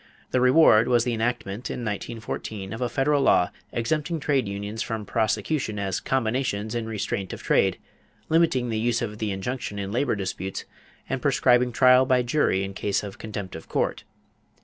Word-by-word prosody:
The 125 - +2
reward 125 -4 +6
was 120 -2 +3
the 120 -1 -1
enactment 115 -1 -2
in 120 - -4
1914 110 -1 -5
of 115 - -6
a 125 - 0
federal 140 +4 +2
law 90 -9 +4 0.2
exempting 155 +7 -1
trade 140 -5 +1
unions 100 +2 -4
from 110 -3 -3
prosecution 110 +2 -1
as 95 -2 -1
combinations 115 -4 -1
in 115 -2 -2
restraint 100 -3 -3
of - - -8
trade, - - +2 0.5
limiting 155 -7 +2
the 110 -1 -1
use 120 +1 +1
of 105 -2 -5
the 110 - -1
injunction 105 +2 -4
in 100 -1 -4
labor 120 +2 +1
disputes, 95 -1 -4 0.4
and - - -2
prescribing 125 0 +3
trial 125 +2 +5
by 130 -2 +3
jury 120 -7 +1
in 95 0 -5
case 100 +1 -1
of 100 -2 -8
contempt 100 -4 -6
of 80 - -10
court. - - -1
115 Hz, 170 wpm, -25 LUFS, 100-125 Hz, 0.5 s, reward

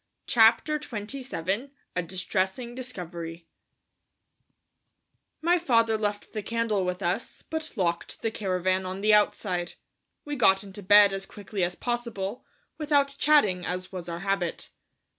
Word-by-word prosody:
CHAPTER 240 +6 +4
XXVII 230 - -4 0.3
A 180 - +1
DISTRESSING 190 +6 -2
DISCOVERY 175 -9 -7 2.0
My 350 +2 +4
father 230 -8 +3
left 205 -1 -3
the 215 - -2
candle 230 -3 0
with 180 0 -2
us, 180 +7 -2
but 320 0 -4
locked 170 -5 -2
the 225 - 0
caravan 185 -2 0
on 185 +1 -5
the 215 +1 +4
outside. 185 -4 +1 0.5
We 295 0 -3
got 195 -6 +4
into 200 0 -9
bed 205 +1 +7
as 195 0 -4
quickly 200 -2 -4
as 175 +1 -1
possible, 235 -3 -3 0.4
without 285 -2 +2
chatting, 210 -12 +4
as 185 +1 -4
was 180 -2 -6
our 170 0 -5
habit. 195 -3 -2
205 Hz, 130 wpm, -27 LUFS, 185-240 Hz, 2.0 s, bed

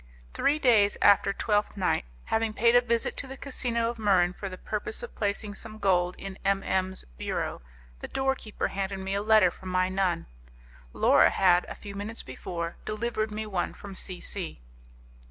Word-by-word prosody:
Three 290 - +2
days 225 -8 +4
after 200 0 +5
Twelfth 205 +1 0
Night, 185 - +1 0.2
having 225 -1 0
paid 235 +2 +4
a 245 - +8
visit 235 -1 0
to 275 - 0
the 270 +1 -8
casino 235 -4 -1
of 235 - -12
Muran 185 -4 +3
for 195 +1 -6
the 185 - -8
purpose 215 - -4
of 485 - -7
placing 205 0 -1
some 215 +1 -7
gold 180 -3 +2
in 195 -1 -8
M 195 0 +1
M 190 0 0
's - - -9
bureau, - - -3 0.4
the - - -6
door 265 0 +1
keeper 220 -5 -4
handed 195 0 -3
me 190 0 -3
a 200 - 0
letter 215 -4 +5
from 185 - -9
my 185 0 +2
nun. 185 - 0 0.7
Laura - - +5
had, 180 -2 +4
a - - -6
few 200 -1 -9
minutes 205 +3 -6
before, 170 +6 -5
delivered 215 0 -2
me 215 +1 -4
one 195 -4 -2
from 200 -1 -9
C 185 -1 -5
C 185 - -5
200 Hz, 190 wpm, -28 LUFS, 190-225 Hz, 0.7 s, a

